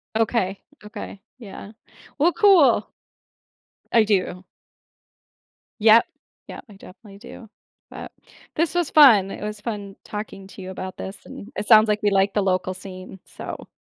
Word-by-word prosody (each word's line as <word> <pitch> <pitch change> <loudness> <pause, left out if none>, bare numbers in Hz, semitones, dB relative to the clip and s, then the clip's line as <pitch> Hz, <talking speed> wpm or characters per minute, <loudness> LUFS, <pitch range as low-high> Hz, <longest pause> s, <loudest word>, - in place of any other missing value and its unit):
Okay. 220 -4 0 0.2
Okay. 210 -2 -9 0.2
Yeah. 205 -2 -11 0.5
Well, 330 +5 +3
cool. 340 - +4 1.1
I 230 -2 +5
do. 185 -3 -1 1.4
Yep. 225 +1 +6 0.4
Yep, - - -10
I 210 - -14
definitely 195 +1 -15
do. 220 +1 -13 0.4
But, - - -10 0.4
this 330 +2 0
was 350 -4 0
fun. 225 -11 +6
It - - -8
was 210 0 -6
fun 205 -3 -6
talking 210 -2 -8
to 195 - -13
you 185 0 -8
about 185 0 -8
this, 195 +1 -7
and 215 +5 -11
it 210 - -5
sounds 220 -1 +7
like 210 0 0
we 205 - +3
like 195 0 +2
the 205 - +1
local 185 0 -1
scene. 185 0 -11
So - - -9
210 Hz, 150 wpm, -22 LUFS, 195-225 Hz, 1.4 s, sounds